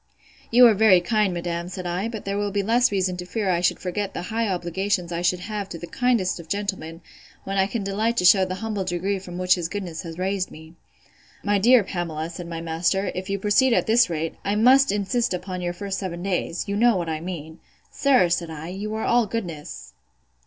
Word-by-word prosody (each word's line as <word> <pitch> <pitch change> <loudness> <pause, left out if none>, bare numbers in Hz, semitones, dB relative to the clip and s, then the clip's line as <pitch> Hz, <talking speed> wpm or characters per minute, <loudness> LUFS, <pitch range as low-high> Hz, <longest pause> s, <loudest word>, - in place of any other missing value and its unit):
You 245 +2 +7
are 230 - +7
very 210 -3 +6
kind, 210 +2 +1
madam, 170 0 -3
said 185 -1 -6
I: 180 +4 -2
but 225 -2 -7
there 200 0 -2
will 205 0 -1
be 200 0 0
the - - -7
less 240 +1 +3
reason 185 -2 0
to 180 - -6
fear 205 -2 -1
I 175 -1 +1
should 175 - +2
forget 195 +2 -4
the - - -4
high 230 0 +1
obligations 180 0 -1
I 170 0 -2
should 180 0 +1
have 205 0 -5
to 170 - -6
the 170 - -7
kindest 235 -4 0
of 165 - -11
gentlemen, 190 -5 -4 0.4
when 195 0 -2
I 190 - +3
can 215 0 -3
delight 215 +4 -1
to 180 - +2
shew 190 +1 +7
the 185 0 -2
humble 210 -3 -2
degree 185 +2 -2
from 180 -2 -9
which 180 0 +3
his 175 -2 -2
goodness 180 -5 -5
had 165 -2 -8
raised 190 0 -1
me.—My 170 +5 -6
dear 240 +2 +6
Pamela, 170 -4 -4
said 170 +1 -8
my 165 -1 -5
master, 175 +4 0
if 185 +1 -5
you 200 - 0
proceed 210 +6 +3
at - - +2
this 230 0 +4
rate, 165 -1 -2
I 200 - 0
must 255 +4 +5
insist 205 +1 0
upon 180 0 -5
your 175 0 -1
first 195 +2 -4
seven 175 -3 -5
days. 185 -1 -2
You 200 0 -2
know 235 -1 +4
what 170 -2 -3
I 155 -1 -3
mean. 160 -3 -7 0.3
Sir, 270 -9 +3
said 170 -1 -1
I, 160 +1 -7
you 205 +4 -5
are 220 - -2
all 240 -2 +3
goodness! 175 -9 -6
190 Hz, 225 wpm, -24 LUFS, 175-210 Hz, 0.4 s, You